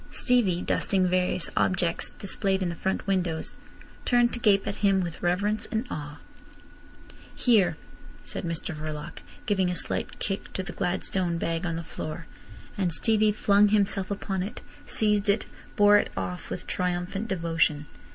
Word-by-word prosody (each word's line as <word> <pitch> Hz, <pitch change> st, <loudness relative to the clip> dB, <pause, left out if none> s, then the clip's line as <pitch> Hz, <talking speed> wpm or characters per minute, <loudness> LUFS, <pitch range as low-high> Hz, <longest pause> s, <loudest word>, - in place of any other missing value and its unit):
Stevie, 205 Hz, -9 st, +2 dB
dusting 190 Hz, -2 st, +1 dB
various 180 Hz, -1 st, 0 dB
objects 175 Hz, -2 st, +1 dB
displayed 195 Hz, -1 st, -1 dB
in 180 Hz, -, 0 dB
the 170 Hz, -, -4 dB
front 190 Hz, +3 st, -2 dB
windows, 180 Hz, -5 st, -1 dB, 0.5 s
turned 240 Hz, -1 st, +3 dB
to 240 Hz, -, -2 dB
gape 200 Hz, -4 st, +4 dB
at 200 Hz, -, -3 dB
him 195 Hz, -2 st, +3 dB
with 170 Hz, -2 st, -5 dB
reverence 200 Hz, +5 st, +1 dB
and 225 Hz, +3 st, 0 dB
awe. 150 Hz, 0 st, -5 dB, 1.2 s
"Here!" 220 Hz, -7 st, +3 dB, 0.5 s
said -, -, -6 dB
Mr 165 Hz, 0 st, -3 dB
Verloc, 155 Hz, -1 st, -6 dB, 0.3 s
giving 190 Hz, -5 st, +2 dB
a 180 Hz, -, -1 dB
slight -, -, -3 dB
kick 195 Hz, -1 st, -4 dB
to 190 Hz, -, -2 dB
the -, -, -7 dB
gladstone 180 Hz, -1 st, -1 dB
bag 165 Hz, +1 st, -1 dB
on 165 Hz, -, -1 dB
the 165 Hz, -, -4 dB
floor; 160 Hz, 0 st, -6 dB, 0.5 s
and 185 Hz, -3 st, 0 dB
Stevie 215 Hz, +4 st, +2 dB
flung 205 Hz, 0 st, +4 dB
himself 200 Hz, -2 st, +1 dB
upon 195 Hz, -2 st, -2 dB
it, 195 Hz, +4 st, -5 dB, 0.3 s
seized 210 Hz, -1 st, +1 dB
it, 200 Hz, +2 st, +2 dB, 0.3 s
bore 205 Hz, 0 st, +7 dB
it -, -, -1 dB
off 90 Hz, -1 st, -4 dB
with -, -, -5 dB
triumphant 180 Hz, +4 st, -2 dB
devotion. 165 Hz, -5 st, +1 dB
190 Hz, 155 wpm, -27 LUFS, 170-205 Hz, 1.2 s, bore